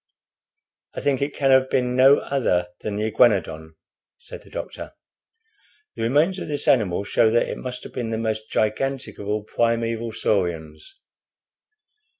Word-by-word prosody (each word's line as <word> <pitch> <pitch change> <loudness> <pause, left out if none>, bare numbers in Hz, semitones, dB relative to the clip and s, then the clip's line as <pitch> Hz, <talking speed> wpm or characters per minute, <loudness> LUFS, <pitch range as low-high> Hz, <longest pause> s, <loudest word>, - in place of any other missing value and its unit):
"I - - -4
think 140 -2 0
it 140 +1 -2
can 135 -1 +2
have 130 0 +4
been 125 -1 0
no 135 +2 +6
other 90 -11 0
than 105 - -4
the 105 - -2
Iguanodon," 95 -9 +1 0.4
said - - -10
the - - -18
doctor. - - -7 1.0
"The - - -6
remains 150 +11 +2
of - - -6
this 145 -1 -3
animal 100 -7 +2
show 110 +2 +3
that 120 +1 +2
it - - -5
must 125 -1 -6
have - - -10
been 120 -3 -3
the 110 - -2
most 110 -1 -3
gigantic 135 +5 -2
of 100 - -7
all 105 0 -1
primeval 115 0 -1
saurians. 85 - -2
115 Hz, 160 wpm, -23 LUFS, 105-130 Hz, 1.0 s, no